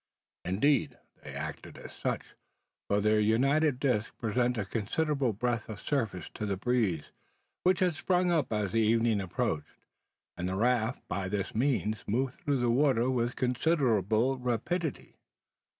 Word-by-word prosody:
Indeed, 120 +9 +2 0.3
they - - -8
acted - - -6
as - - -10
such; - - -2 0.6
for 100 0 +2
their 105 +1 +3
united 135 +6 +3
discs 125 -6 0
presented 120 +1 0
a - - -4
considerable 130 +6 0
breadth 115 +1 -2
of 105 -2 -6
surface 110 - -2
to 105 - -4
the 100 -1 -1
breeze, 105 -8 0 0.5
which 185 0 +2
had 180 -2 +3
sprung 180 +2 +1
up 160 -8 +1
as 105 -3 0
the 115 - +2
evening 110 -1 +3
approached, 80 -4 -3 0.6
and 90 +1 -3
the 95 - -2
raft 120 +2 0
by 95 +1 -2
this 100 -1 -2
means 110 -4 0
moved 125 +5 -1
through 145 -1 0
the 120 -1 +1
water 130 -1 +3
with 120 -1 0
considerable 125 - +1
rapidity. 125 - -2
120 Hz, 150 wpm, -30 LUFS, 105-135 Hz, 0.6 s, their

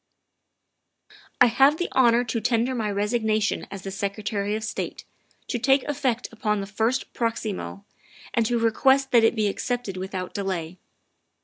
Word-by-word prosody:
" - - -27
I - - +10
have 270 +5 +4
the 350 - -1
honor 245 -2 +4
to 230 -1 -2
tender 235 +3 +1
my 225 -4 -1
resignation 215 +1 0
as 195 -1 -8
the 195 - -5
Secretary 200 +1 -2
of 220 - -4
State, 220 - -4 0.4
to 240 - -2
take 270 +3 +3
effect 260 -4 -1
upon 215 -2 -1
the 195 - -3
first 225 +6 -1
proximo, 210 - -3 0.5
and 230 - +2
to 240 - +1
request 265 +4 +3
that 235 -2 +6
it 225 - +4
be 215 -2 +1
accepted 225 -1 -3
without 185 -1 -5
delay. 185 -3 -3
225 Hz, 155 wpm, -25 LUFS, 200-245 Hz, 0.5 s, I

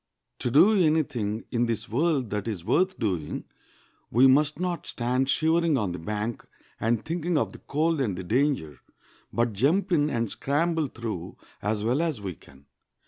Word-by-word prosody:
To - - -1
do 165 - +6
any 160 -4 +4
thing 115 -6 -3
in 120 -1 +1
this 115 -2 -2
world 135 -1 0
that 105 +1 -2
is 95 -7 -4
worth 185 - +2
doing 90 -9 -2 0.7
we 125 +4 +5
must 145 +4 +4
not 180 -3 -2
stand 125 +2 0
shivering 160 0 +2
on 105 -6 -1
the 90 - -5
bank, 105 +6 -3 0.4
and 115 0 0
thinking 170 0 -1
of - - 0
the - - -12
cold 155 +1 0
and 100 -9 -1
the 95 - -5
danger, 115 - 0 0.5
but 120 -1 0
jump 165 - +1
in 150 -3 +3
and 115 -5 -1
scramble 160 +2 0
through 110 -8 -6 0.2
as 105 0 -1
well 125 +7 +1
as 160 -8 -1
we 95 -3 -5
can. 70 -3 -19
125 Hz, 175 wpm, -26 LUFS, 105-155 Hz, 0.7 s, do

